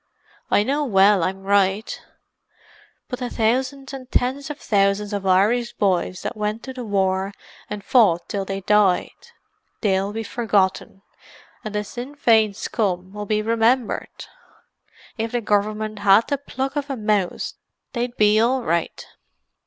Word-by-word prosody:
"I 205 - +4
know 285 +6 0
well 200 -5 +4
I'm 190 +3 -2
right. 200 +1 +1 1.1
But 250 - -5
the 250 -1 -3
thousands 260 +4 -1
and 260 -2 -8
tens 265 +3 0
of 295 - -5
thousands 200 0 +1
of 200 -1 -3
Irish 215 +6 +2
boys 185 -2 0
that - - -4
went 210 +1 -3
to 260 - -7
the 255 -1 -6
war 195 -2 0 0.4
and 210 -1 -5
fought 185 -9 +3
till 200 -1 -2
they 195 0 -4
died—they'll 205 - -1
be 225 +1 -4
forgotten, 200 -4 -1 0.6
and 215 -2 -6
the 210 - 0
Sinn 245 +7 -8
Fein 220 -7 +3
scum'll 195 -1 -3
be 215 0 0
remembered. 230 +2 0 0.9
If 225 +1 -2
the 240 - 0
Gov'mint 215 0 -1
had 200 +2 +4
the 285 - 0
pluck 270 0 -4
of 290 0 -3
a 270 - -3
mouse 210 -4 -1 0.4
they'd 240 0 -3
be 210 0 +4
all 250 +3 +2
right. 170 -3 -2
210 Hz, 145 wpm, -22 LUFS, 195-245 Hz, 1.1 s, I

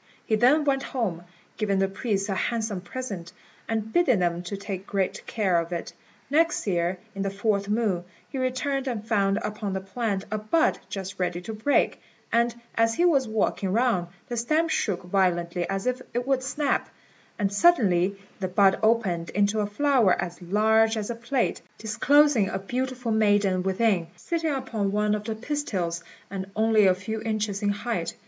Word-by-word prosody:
He 220 - +2
then 260 +8 +4
went 270 -1 +2 0.2
home, 175 -8 -1 0.3
giving 205 -3 +1
the 195 0 +2
priests 195 0 -2
a 200 - -1
handsome 220 -1 -1
present, 190 -5 -6 0.4
and 220 -1 -2
bidding 310 -10 +4
them 175 -1 0
take 195 +1 -6
great 195 -2 -1
care 190 -6 +1
of 170 +1 -4
it. 170 - -4 0.3
Next 320 +4 +2
year, 175 -2 0 0.2
in 195 - -5
the 195 - 0
fourth 200 0 0
moon, 210 -5 0 0.2
he 270 - -5
returned 260 +2 -1
and 225 -4 -3
found 200 -3 +2
upon 210 -2 -3
the 190 - -1
plant 195 0 -3
a 215 - -1
bud 265 +10 +2
just 195 0 -6
ready 180 -1 -1
to 220 +5 -6
break; 220 +7 +1 0.3
and 235 0 +2 0.2
as 225 0 +2
he 350 - +3
was 275 -8 +3
walking 210 -3 0
round, 225 -5 +2 0.2
the 240 - -4
stem 310 +8 +2
shook 195 - -1
violently 175 -2 0
as 195 0 -2
if 255 0 0
it 245 0 0
would 270 -1 +1
snap, 280 +2 -1 0.5
and 200 -2 0
suddenly 200 - +4 0.2
the 190 - -1
bud 190 +1 +4
opened 215 -7 +1
into 205 +2 +1
a 205 - 0
flower 245 -3 +3
as 175 +1 -4
large 220 +4 +3
as 215 +2 -2
a - - -4
plate, 235 +2 -1 0.2
disclosing 230 +1 +3
a 190 - -2
beautiful 250 +4 -3
maiden 205 -3 +3
within, 190 -2 +1
sitting 330 -2 -2
upon 235 -7 -2
one 210 +1 +1
of 210 0 -2
the 220 -1 -2
pistils, 215 - -2 0.3
and 190 -1 -5
only 220 -1 +4
a 185 - +4
few 215 +4 -5
inches 215 -2 -2
in 205 - +1
height. 205 -3 -2
210 Hz, 175 wpm, -26 LUFS, 190-240 Hz, 0.5 s, then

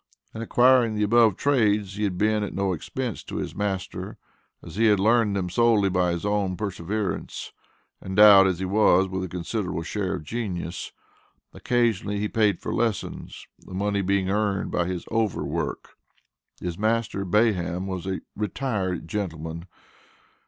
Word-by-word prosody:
In 110 - -6
acquiring 120 -1 +4
the 105 - 0
above 110 -1 +4
trades 105 -8 +1
he 105 0 -1
had 95 -3 -2
been 105 +2 +2
at 100 - -5
no 95 -1 0
expense 120 +7 -4
to - - -7
his - - -3
master, 100 -2 -4 0.5
as 85 - -10
he 115 +2 +2
had 105 -3 +4
learned 110 0 +3
them 95 -2 -1
solely 110 0 +3
by 90 -1 +1
his 85 +3 -3
own 100 -3 0
perseverance, 100 0 -4 0.5
endowed 100 0 +7
as 95 -2 0
he 95 - -3
was 95 -1 +4
with 95 0 -3
a - - -3
considerable 90 0 -3
share 95 +2 -2
of - - -7
genius. 90 -3 -4 0.6
Occasionally 115 -4 0
he 105 +1 -1
paid 105 -4 +1
for - - -4
lessons, 115 -3 -3
the 95 - -11
money 100 +1 0
being 95 0 +1
earned 100 0 0
by 85 - 0
his 90 -2 -4
over 110 -3 0
work. - - -3 0.7
His 90 0 -5
master, 110 -2 0
Bayham, 90 -3 +1
was 95 -1 -5
a 95 -1 -2
"retired 100 -5 -2
gentleman." 85 -3 -4
100 Hz, 160 wpm, -25 LUFS, 90-110 Hz, 0.7 s, endowed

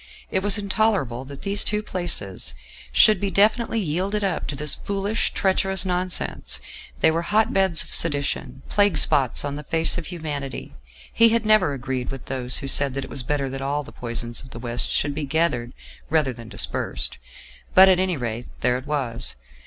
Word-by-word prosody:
It 190 - +1
was 205 +2 +5
intolerable 195 - 0
that 140 0 -10
these 200 +1 +2
two 210 0 0
places 175 - -1 0.4
should 215 - +6
be 200 - -1
definitely 220 +4 +2
yielded 195 +4 -1
up 190 -4 -1
to 145 - -3
this 150 +1 +1
foolish, 200 +2 -1
treacherous 190 0 +1
nonsense: 180 0 -2 0.4
they - - +5
were 165 +1 0
hot 210 +5 +1
beds 190 -4 +2
of - - -11
sedition; 140 -4 0
plague 205 -4 +2
spots 140 -3 +3
on 145 0 -3
the 150 - -7
face 165 +3 +1
of 165 - -7
humanity. 150 -6 -5 0.4
He 230 0 +6
had 230 0 +1
never 215 -8 +4
agreed 130 -1 -4
with 135 -2 -7
those 125 -2 -2
who - - -4
said 135 -1 +2
that 135 - -2
it - - -10
was 135 - -1
better 140 +2 -1
that 135 +1 -6
all 145 +2 -1
the - - -12
poison 120 -1 -1
of 130 - -13
the - - -10
West 120 0 +2
should 145 - +1
be 150 +1 -4
gathered 135 -5 0 0.4
rather 150 -5 +1
than 115 -1 -11
dispersed. 115 - -3 0.6
But, 190 +1 +9
at 185 -1 +4
any 185 -3 0
rate, 120 -1 -4
there 125 0 +2
it 130 - -13
was. 130 -5 -3
150 Hz, 190 wpm, -23 LUFS, 130-190 Hz, 0.6 s, But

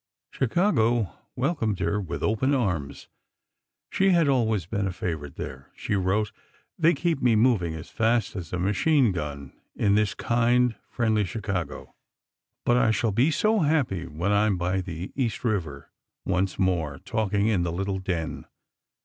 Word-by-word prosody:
Chicago 120 - +1 0.2
welcomed 125 - 0
her 105 +2 0
with 90 - -5
open 120 +6 +2
arms: 90 - -2 0.8
she 195 0 +3
had 170 -4 +4
always 110 - +1
been 100 +2 -2
a - - -2
favorite 80 -5 -4
there. 65 0 -7
She - - -3
wrote: 100 +2 +1 0.4
"They 170 0 +3
keep 170 -5 -1
me 120 -3 +4
moving 105 -8 +2
as 80 +1 -9
fast 115 0 +1
as 90 -4 -6
a 90 - -2
machine 110 - +2
gun 75 -5 -5 0.2
in 100 - +2
this 105 0 +2
kind, 120 +1 +2 0.2
friendly 110 -3 +1
Chicago. 95 -4 -4 0.7
But 120 - +4
I 120 - +3
shall 110 0 +1
be 120 +9 +3
so 215 +7 +2
happy 145 - +1
when 85 +6 -2
I 105 +1 +3
am 100 -3 +1
by 90 +2 0
the 90 0 -6
East 125 -5 -2
River, 85 - -2 0.3
once 95 0 0
more, 85 -6 0
talking 105 +2 -1
in 110 -5 +2
the 85 -1 -1
little 95 +2 -2
den." 85 -5 -3
105 Hz, 160 wpm, -26 LUFS, 90-120 Hz, 0.8 s, had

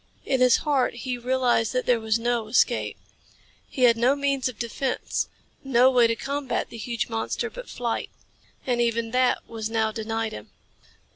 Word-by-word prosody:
In 265 -2 +1
his 250 -1 +6
heart 275 -5 +1
he 250 +1 -3
realized 245 -2 +1
that 255 0 0
there 245 -2 +3
was 220 0 +1
no 235 -1 -1
escape. 230 - +1 0.7
He 255 - -2
had 235 -2 +6
no 250 +4 +3
means 275 -2 0
of 240 - -10
defense, 245 +3 -2 0.3
no 260 -1 +4
way 245 -2 +5
to 230 - 0
combat 275 +1 -3
the 230 - -8
huge 235 +1 -3
monster 225 -1 -3
but - - -9
flight. 235 -2 -3 0.6
And 245 -2 +1
even 230 -1 0
that 255 +1 +1
was 225 -1 -5
now 220 -1 +1
denied 225 0 -3
him. 105 0 -9
240 Hz, 170 wpm, -25 LUFS, 225-255 Hz, 0.7 s, his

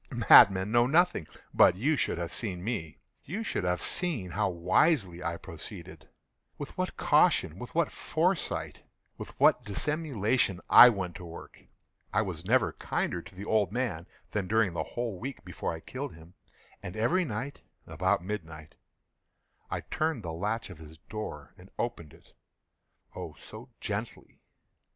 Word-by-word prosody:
Madmen 95 +1 +8
know 120 +1 +4
nothing. 160 - +2 0.3
But 90 - +6
you 140 +11 +1
should - - -1
have 85 -1 -4
seen 90 -6 -3
me. 100 -9 -4 0.3
You 200 +10 -4
should 160 - -2
have 90 0 0
seen 140 - -1
how 100 +2 0
wisely 90 - +2
I 85 -1 -2
proceeded—with 85 -4 -11
what - - -3
caution—with - - +2
what - - +2
foresight—with - - -3
what 125 - +5
dissimulation 120 - 0
I 125 - +11
went 95 -6 -3
to - - -10
work! 85 0 -11 0.5
I 110 - +2
was 90 -5 -6
never 110 -3 +2
kinder 85 - -2
to 95 - -15
the 100 +2 -7
old 105 -4 +1
man 110 -9 -2 0.2
than 100 -3 -2
during 110 -3 +2
the - - -2
whole 115 -6 -4
week 135 +4 -7
before - - -4
I 80 -1 -7
killed 135 - -6
him. 80 +2 -15 0.5
And 90 - -7
every 170 +13 +2
night, 135 0 -5 0.2
about - - 0
midnight, 80 -6 -7 1.0
I - - -3
turned 155 -7 -2
the 85 -2 -4
latch 105 +5 -3
of 85 - -12
his 80 0 -12
door 75 -9 -6
and 90 +2 -15
opened 115 -11 -4
it—oh, - - -14
so - - -12
gently! - - -6
100 Hz, 145 wpm, -29 LUFS, 85-120 Hz, 1.0 s, I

